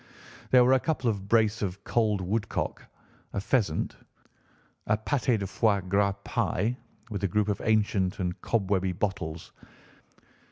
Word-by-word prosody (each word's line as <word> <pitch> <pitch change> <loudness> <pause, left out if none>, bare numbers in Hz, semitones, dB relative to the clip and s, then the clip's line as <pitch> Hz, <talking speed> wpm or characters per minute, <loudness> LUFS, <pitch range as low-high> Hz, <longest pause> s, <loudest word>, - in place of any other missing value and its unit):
There 125 -1 +6
were 130 - +5
a 130 - +5
couple 135 -5 0
of 100 -2 -6
brace 110 -1 +3
of 100 0 -3
cold 110 -4 +1
woodcock, 105 +4 -2 0.5
a - - -1
pheasant, 100 -6 0 0.9
a 105 - +3
pâté 120 +1 +1
de 100 - -3
foie 100 +1 +2
gras 100 +1 +2
pie 110 +7 0 0.4
with 100 -1 -4
a - - +3
group 105 +3 +1
of 105 - -1
ancient 105 -4 +1
and 90 -1 -3
cobwebby 95 -4 0
bottles. 90 -4 -3
105 Hz, 145 wpm, -28 LUFS, 95-110 Hz, 0.9 s, There